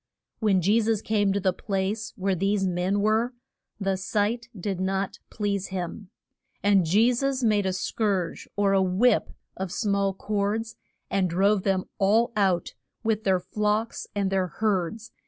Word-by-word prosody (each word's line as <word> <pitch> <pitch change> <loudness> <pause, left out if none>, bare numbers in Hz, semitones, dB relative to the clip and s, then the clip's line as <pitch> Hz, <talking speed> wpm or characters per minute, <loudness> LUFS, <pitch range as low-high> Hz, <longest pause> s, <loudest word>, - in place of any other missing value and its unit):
When 195 -5 +2
Je 210 +6 +4
sus 220 -1 +1
came 205 -2 +1
to 200 - +1
the 185 -1 +1
place 200 +3 -2
where 195 -2 0
these 195 +2 +1
men 185 +2 0
were, 220 +4 +1 0.4
the 195 -1 0
sight 215 +5 -1
did 190 0 -3
not 190 +1 -1
please 200 -2 -2
him. 185 +1 -5 0.5
And 195 -4 +4
Je 220 +8 +4
sus 270 +1 -1
made 210 -3 +3
a - - +1
scourge, 190 -2 -1
or 195 -1 +3
whip 190 +7 +3 0.3
of 190 -2 -4
small 200 -2 0
cords, 215 +3 -2 0.4
and 190 -2 +1
drove 195 +4 +3
them 190 -1 +1 0.2
all 215 +5 +3
out, 190 -5 +1 0.3
with 220 -1 0
their 190 -2 +3
flocks 210 +4 -1
and 200 -1 0
their 190 -1 +1
herds. 210 +2 -2
200 Hz, 155 wpm, -26 LUFS, 190-215 Hz, 0.5 s, Je